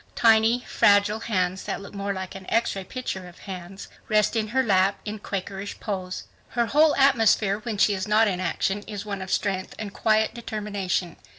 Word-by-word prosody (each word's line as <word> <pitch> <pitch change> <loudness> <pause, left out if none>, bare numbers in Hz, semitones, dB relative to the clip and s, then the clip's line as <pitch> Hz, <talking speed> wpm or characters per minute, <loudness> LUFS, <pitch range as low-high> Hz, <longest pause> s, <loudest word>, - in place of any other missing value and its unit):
Tiny, 225 +1 +4
fragile 205 +1 +4
hands 190 -4 -1
that - - -3
look 200 +1 -11
more 200 0 -3
like 190 -1 -5
an 190 -1 -10
X 230 -2 +1
ray 195 - -4
picture 190 -4 -5
of 175 - -14
hands, 190 0 -8 0.2
rest 215 +1 +3
in 220 -1 0
her 260 +5 +1
lap 195 -3 +2
in 215 0 -5
Quakerish 195 0 -5
pose. 185 -3 -4 0.3
Her 235 - +3
whole 300 +5 +4
atmosphere 225 -7 +3
when 220 -1 -4
she 205 - +4
is 190 0 -3
not 215 +1 +4
in 185 -3 -1
action 190 +3 -1
is 205 -1 -6
one 200 -2 -4
of 190 - -6
strength 190 -1 -1
and 205 -2 -6
quiet 220 0 +2
determination. 205 -6 -3
205 Hz, 190 wpm, -25 LUFS, 190-220 Hz, 0.3 s, Tiny